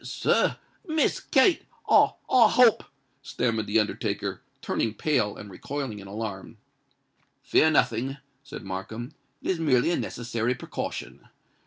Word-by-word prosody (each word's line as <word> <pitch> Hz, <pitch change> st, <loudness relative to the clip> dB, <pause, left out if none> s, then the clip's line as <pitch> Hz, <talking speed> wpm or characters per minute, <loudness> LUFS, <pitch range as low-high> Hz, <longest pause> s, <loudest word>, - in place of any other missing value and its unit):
"Sir—Miss 315 Hz, -6 st, 0 dB
Kate—I—I 260 Hz, -, +3 dB
hope——" 235 Hz, -2 st, +5 dB, 0.4 s
stammered 115 Hz, -5 st, -1 dB
the -, -, +3 dB
undertaker, 105 Hz, -, -2 dB, 0.2 s
turning 110 Hz, -1 st, -2 dB
pale, 125 Hz, -10 st, 0 dB
and 105 Hz, -, -10 dB
recoiling 130 Hz, +2 st, -5 dB
in 100 Hz, -, -11 dB
alarm. 100 Hz, -1 st, -6 dB, 0.9 s
"Fear 160 Hz, -, +4 dB
nothing," 135 Hz, -2 st, +1 dB, 0.3 s
said 140 Hz, -, -9 dB
Markham: 110 Hz, +6 st, -6 dB, 0.3 s
"it -, -, 0 dB
is 180 Hz, -, -2 dB
merely 145 Hz, -1 st, +3 dB
a -, -, +1 dB
necessary 120 Hz, 0 st, -2 dB
precaution. -, -, -6 dB
125 Hz, 115 wpm, -26 LUFS, 110-160 Hz, 0.9 s, hope